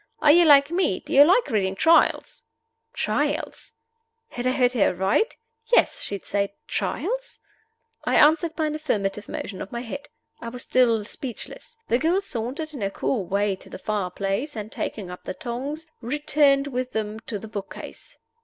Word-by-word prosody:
Are 295 - +6
you 345 +2 +6
like 285 -1 +6
me? 345 - +1
Do - - -8
you 280 - +9
like 375 +10 +4
reading 195 -3 +1
Trials?" 325 +10 +3 0.5
Trials? 470 - -2 0.6
Had 245 +1 -3
I - - +3
heard 250 -1 +2
her 230 -6 +3
aright? 195 - +1 0.3
Yes: - - +3
she 200 - 0
had 195 - -9
said 200 0 0 0.2
Trials. - - -3 0.6
I - - 0
answered 320 +2 +4
by 315 - 0
an 305 - -1
affirmative 210 -10 -2
motion 190 -2 -5
of 195 - -7
my 235 - -4
head. 280 +5 -7 0.3
I 235 - -6
was 245 +1 -6
still 230 -4 +2
speechless. 265 - -7
The 240 - +2
girl 335 +6 +2
sauntered 280 - -4
in 270 - -7
her 195 - 0
cool 200 +1 -2
way 200 +2 0
to - - -15
the - - -8
fire 200 -1 -2
place, 195 - -3
and, 215 0 -6
taking 190 -5 -4
up 180 - -10
the - - -4
tongs, 275 +6 -5 0.2
returned 280 +2 +2
with 255 -2 -3
them 215 0 -3
to 215 - -2
the 220 - -9
book 205 -2 -6
case. - - -11
245 Hz, 180 wpm, -24 LUFS, 205-300 Hz, 0.6 s, you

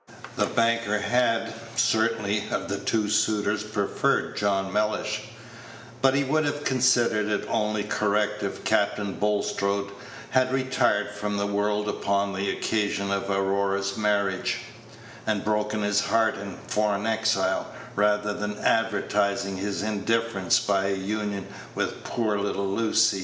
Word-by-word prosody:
The - - +1
banker 115 -2 +1
had, 115 +1 +1 0.2
certainly, 110 -3 +1
of - - -2
the 100 0 -2
two 110 0 0
suitors, 105 0 +1
preferred - - 0
John 95 -2 0
Mellish; 105 0 -1 0.8
but 135 0 +4
he 140 - +3
would 155 +3 +1
have 145 0 -2
considered 120 -5 +3
it 105 -1 -1
only 105 -2 0
correct 105 0 0
if 100 -1 -4
Captain 100 -1 +1
Bulstrode 100 -1 0 0.4
had 130 0 +3
retired 130 -6 +1
from 105 0 -3
the 100 - 0
world 105 +1 0
upon 100 -1 0
the 100 +1 -1
occasion 100 -2 -1
of 100 0 -1
Aurora's 100 0 0
marriage, 100 -3 0 0.7
and 105 -2 0
broken 105 0 0
his 105 0 +2
heart 110 +1 +2
in 100 0 -7
foreign 105 -1 0
exile, 110 -4 +1 0.3
rather 105 0 +2
than 105 0 -4
advertising 100 -3 +1
his 100 +1 -2
indifference 110 -2 +1
by 100 -1 +1
a 100 0 +1
union 100 0 -3 0.3
with - - -2
poor 110 -3 -1
little 100 -1 -1
Lucy. 110 0 +2
105 Hz, 135 wpm, -26 LUFS, 100-110 Hz, 0.8 s, but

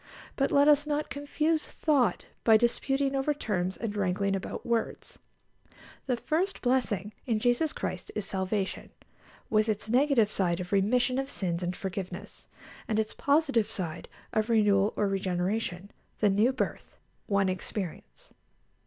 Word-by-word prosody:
But 275 - +1
let 285 +1 +5
us 295 0 +5
not 300 0 -1
confuse 300 +2 0
thought 285 -6 +1 0.2
by 220 -1 +7
disputing 270 +4 +1
over 275 +2 +1
terms 185 -8 -2
and 220 -3 -4
wrangling 195 0 0
about 190 - -5
words. 235 -1 -2 0.9
The 250 -2 +1
first 345 +10 -1
blessing 220 -6 0
in 230 -3 +2
Jesus 245 +7 +2
Christ - - -5
is 210 - -2
salvation, 190 +1 -2 0.6
with 215 0 +3
its 215 +1 -2
negative 250 -4 +4
side 175 -4 0
of 180 0 -6
remission 245 +6 +2
of 270 0 -3
sins 175 -8 -2
and 180 0 -2
forgiveness, 185 -1 -6 0.4
and 215 - 0
its 220 0 0
positive 280 -6 +2
side 170 -4 -5 0.2
of 215 +1 +1
renewal 210 -3 +4
or 205 - +1
regeneration 190 0 -2 0.3
the 205 -2 +4
new 215 +6 +3
birth 260 - -4 0.3
one 200 -2 +2
experience. 185 -1 -5
215 Hz, 145 wpm, -29 LUFS, 195-270 Hz, 0.9 s, by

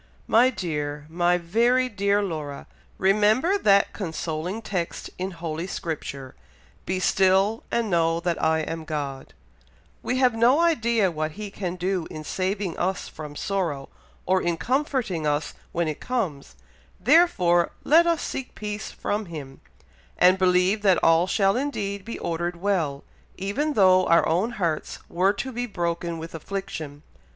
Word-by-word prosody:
"My 240 +3 +5
dear, 150 - -4
my 175 +2 +2
very 235 +9 +2
dear 200 -2 +1
Laura! 155 -6 -5 0.3
remember 215 - +3
that 200 - +4
consoling 170 +3 -4
text 180 -5 -4
in 185 +1 -2
holy 165 -1 -5
Scripture, 140 -7 -5 0.5
'Be 185 +1 0
still, 195 +3 +3
and 230 -3 -1
know 165 -1 +2
that 170 -1 -2
I 160 0 +3
am 160 +1 -4
God;' 145 -4 -5 0.7
we 250 - -1
have 255 -2 +4
no 240 +6 +4
idea 235 - +2
what 155 -1 -3
He 210 +1 -7
can 185 -3 -4
do 180 -1 -2
in 155 -1 -7
saving 190 +1 -2
us 185 +1 -1
from 150 -1 -9
sorrow, 165 -7 -2 0.4
or 185 0 +2
in 170 -1 0
comforting 250 - -1
us 150 +1 -1 0.2
when 170 -1 0
it 155 - -3
comes, 190 - -3 0.4
therefore 180 - +4
let 335 +3 +5
us 335 -2 +1
seek 265 -1 -5
peace 210 0 -5
from 210 +1 -3
Him, 145 -5 -9 0.6
and 185 +1 +5
believe 185 +3 +3
that 190 -4 +4
all 165 +2 +5
shall 195 +1 +2
indeed 205 -8 -2
be 230 - -6
ordered 170 +1 -2
well, 170 -7 -1 0.3
even 265 +11 -1
though 185 -4 +5
our 170 0 +4
own 185 +9 +1
hearts 170 -8 -2
were 190 +3 +2
to 260 +6 -4
be 245 0 -3
broken 170 -3 -2
with 165 +1 -8
affliction. 160 -4 -6
185 Hz, 150 wpm, -25 LUFS, 165-215 Hz, 0.7 s, My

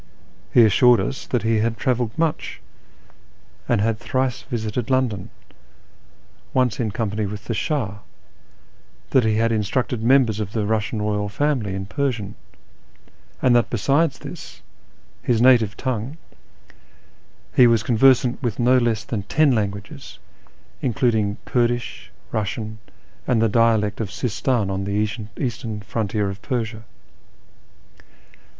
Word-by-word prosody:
He 120 - +7
assured 120 +2 +5
us 120 +8 -4
that 125 -4 -1
he 115 -1 +2
had 115 +1 0
travelled 120 -3 -1
much, 165 -1 -1 1.1
and 120 - +3
had 110 0 0
thrice 130 +1 -1
visited 115 -1 -3
London, 125 -8 0 1.3
once 125 -4 +2
in 115 -3 0
company 105 -1 -2
with 100 +1 -7
the 115 - -2
Shah; 110 - -2 1.1
that 130 - +4
he 110 -1 +2
had 115 +1 +2
instructed 115 +2 -1
members 120 -3 +3
of 105 -1 -4
the 110 -3 -1
Eussian 105 0 -1
royal 105 -1 -1
family 120 -5 -1
in 95 0 -4
Persian; 115 -4 -2 1.1
and 125 -2 +5
that 120 - +3
besides 140 +7 +1
this, - - -10 0.6
his 120 -3 +1
native 120 -4 +4
tongue, 130 +3 -3 1.4
he 125 - +7
was 115 -2 +3
conversant 125 +1 +3
with 120 -5 -2
no 125 +1 +4
less 115 -3 0
than 110 -4 -3
ten 145 +9 +2
languages, 100 -2 -4 0.6
including 110 -3 +1
Kurdish, 120 -1 -1 0.2
Eussian, 110 +1 -3 0.5
and 125 -3 +2
the 115 - +3
dialect 110 -2 +2
of 105 - -3
Sistan 115 0 -1
on 95 0 -2
the 105 +2 0 0.3
eastern 115 -4 -4
frontier 105 -1 -2
of 100 - -10
Persia. 115 -4 -3
115 Hz, 130 wpm, -22 LUFS, 105-125 Hz, 1.4 s, He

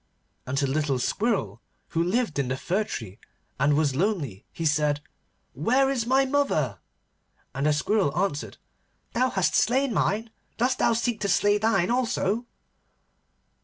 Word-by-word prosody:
And 135 +2 -2
to 140 - +2
the 135 - -1
little 145 -2 0
Squirrel 125 - -1 0.3
who 165 0 0
lived 190 - 0
in 135 - 0
the 130 +1 -2
fir 190 +9 -1
tree, 110 - -7 0.4
and 145 +1 +3
was 145 -3 +1
lonely, 150 - -1
he 165 - -5
said, 150 -1 +2 0.5
'Where 255 - +2
is 240 -4 -1
my 265 +2 +4
mother?' 155 - 0 0.7
And 140 +2 0
the - - +4
Squirrel 185 +2 +1
answered, 175 -6 -2 0.6
'Thou 255 +2 +2
hast 190 -7 +1
slain 260 +3 +2
mine. 220 +2 0 0.3
Dost 250 +3 +1
thou 235 - +3
seek 230 0 -1
to 205 - -1
slay 205 +1 +3
thine 200 -3 +2
also? 240 -2 0
190 Hz, 155 wpm, -26 LUFS, 145-230 Hz, 0.7 s, my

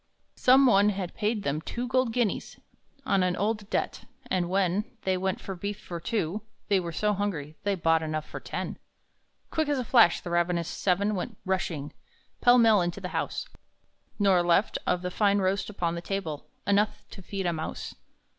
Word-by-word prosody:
Some 265 +2 +6
one 205 -4 +5
had 190 -3 -3
paid 210 0 -1
them 145 +2 -1
two 240 +8 -4
gold 255 -1 +2
guineas 230 -4 -1 0.5
On 195 - +2
an 180 -1 +1
old 210 +1 -1
debt; - - -2 0.3
and 180 -2 +1
when 190 +1 +1 0.2
They 190 -1 +1
went 190 0 -1
for 195 - -6
beef 200 +2 -5
for 170 -1 -6
two, 205 0 -2 0.3
they 200 -2 +4
were 170 -2 -4
so 210 +5 +1
hungry 170 -7 -3
They 200 -1 0
bought 165 -2 +2
enough 155 -1 -3
for - - -7
ten. - - -5 0.7
Quick 315 -2 0
as 290 - +1
a 255 - -2
flash 225 -8 +5
the 175 - -7
ravenous 175 -1 +1
seven 200 +4 +1
went 200 +2 -4
rushing 175 -6 -2 0.5
Pell 245 0 +7
mell 225 -4 +6
into 175 +2 -2
the 180 -2 -5
house, - - -2 0.7
Nor 195 -4 +4
left, 175 +4 +2
of 180 0 +1
the 180 - -2
fine 200 +1 +3
roast 190 0 0
upon 175 -5 -1
the 170 - -4
table, 175 -6 -4 0.2
Enough 210 +1 +1
to 195 - -10
feed 195 +1 -4
a 175 - +1
mouse. 160 0 -5
190 Hz, 185 wpm, -28 LUFS, 175-210 Hz, 0.7 s, Pell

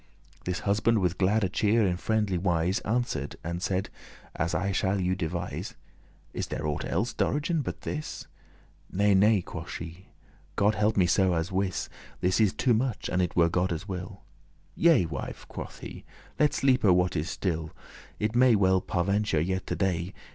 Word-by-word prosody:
This 90 0 -2
husband 110 +3 +2
with 90 -3 0
glad 100 +2 +3
cheer,* 110 +1 +3
in 90 -2 +1
friendly 105 -1 0
wise, 90 +2 +1
*demeanour 110 +1 -1
Answer'd 80 - -2
and 85 +2 -4
said, 95 0 -1 0.4
as 85 +1 -1
I 100 +1 0
shall 95 0 +1
you 90 0 +1
devise.* 90 0 -3
*relate - - -6 0.6
"Is - - -2
there 75 - -4
aught 75 -1 -2
elles, - - -1
Dorigen, 150 +2 0
but - - -5
this?" 150 0 -5 0.7
"Nay, 100 +2 +3
nay," 100 0 +4
quoth - - -7
she, 85 +3 -8 0.5
"God 105 +2 +3
help 105 0 +1
me 95 - +5
so, 90 0 +3
*as 80 +2 -2
wis* 95 -3 -1
*assuredly* - - -25 0.3
This 90 +3 +2
is 105 -3 +3
too 125 - +2
much, 115 0 -1
an* 90 - +1
it 90 - -1
were 85 -1 +5
Godde's 90 +2 -1
will." 90 -2 -6 0.5
*if - - -7
"Yea, 160 - +6
wife," 70 -6 -6
quoth - - -8
he, - - -8 0.4
"let 150 -1 +3
sleepe 135 -1 +3
what 90 -2 +4
is 80 +1 -1
still, 80 -4 -2 0.5
It 110 +2 -1
may 125 0 +6
be - - +5
well 95 -2 +3
par'venture 100 0 0
yet 95 +4 -1
to - - -1
day. 90 -2 -1
95 Hz, 185 wpm, -28 LUFS, 90-105 Hz, 0.7 s, Yea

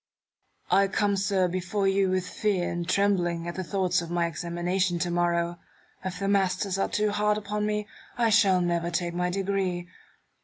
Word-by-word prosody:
I 195 0 +5
come, 200 +1 +1
sir, 190 -1 +1
before 185 +3 -1
you 195 0 +2
with 185 0 0
fear 200 -5 -1
and 170 0 -4
trembling, 175 -4 +1
at 170 - -3
the 185 - -4
thoughts 185 -1 0
of 170 - -7
my 175 0 +1
examination 175 +2 -1
to 175 +1 -1
morrow. 175 0 0 0.4
If 185 -1 -4
the 195 +1 -2
masters 195 -1 +1
are - - +1
too 210 0 +1
hard 210 0 +1
upon 210 0 -2
me, 210 0 -2 0.3
I 230 -2 +2
shall 195 -4 +5
never 170 -1 0
take 170 0 -2
my 180 +1 0
degree. 190 -2 -1
185 Hz, 180 wpm, -27 LUFS, 175-200 Hz, 0.4 s, I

